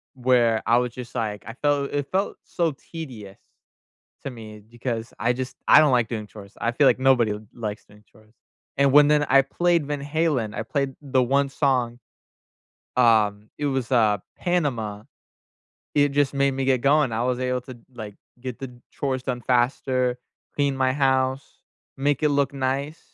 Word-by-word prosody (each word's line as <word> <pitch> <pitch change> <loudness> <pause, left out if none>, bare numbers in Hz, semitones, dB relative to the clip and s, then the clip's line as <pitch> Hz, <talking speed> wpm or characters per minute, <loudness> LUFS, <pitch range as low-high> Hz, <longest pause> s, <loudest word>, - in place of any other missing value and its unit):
where 120 -3 +2
I 115 - +4
was 125 0 0
just 125 -1 -9
like 105 -5 -3
I 115 - -6
felt 145 -1 +1
it 145 -1 -2
felt 195 +2 -1
so 170 -2 -1
tedious 125 - -9 0.9
to 140 - -3
me 110 -3 -10
because 115 +1 -5
I 120 +2 +1
just 130 0 -5
I - - +9
don't 150 -3 +5
like 120 -3 +2
doing 110 -3 -4
chores. 100 0 -13
I 115 - 0
feel 140 +3 +3
like - - +4
nobody 120 -5 +3 0.2
likes 110 -3 -5
doing 105 +1 -20
chores, 110 0 -23 0.5
and 140 -1 +4
when 145 +1 +7
then 150 0 +3
I 135 +1 +6
played 170 +3 +1
Van 145 -1 -3
Halen, 145 -7 -1
I - - -2
played 135 +3 -2
the 135 -2 +1
one 140 +2 +1
song, 125 -5 0 1.0
um, 110 -4 +3
it 150 - -1
was, 135 -3 -2
uh, 110 -4 +4 0.2
Panama, 120 - -1 0.9
it 145 0 +4
just 145 -1 +2
made 140 0 +2
me 135 0 -2
get 130 -2 +2
going, 145 0 +3
I 110 +1 -1
was 125 0 -1
able 125 0 -1
to 130 +1 -10
d 120 - -19
like, 105 -4 -8 0.3
get 125 -1 -6
the 135 -2 -6 0.2
chores 130 -2 -2
done 125 -2 -2
faster, 125 0 +1 0.4
clean 140 -2 0
my 130 -1 +2
house, 130 -1 +1 0.6
make 145 +1 0
it 150 - +3
look 140 -1 +1
nice. 140 +3 -2
130 Hz, 180 wpm, -24 LUFS, 115-140 Hz, 1.0 s, I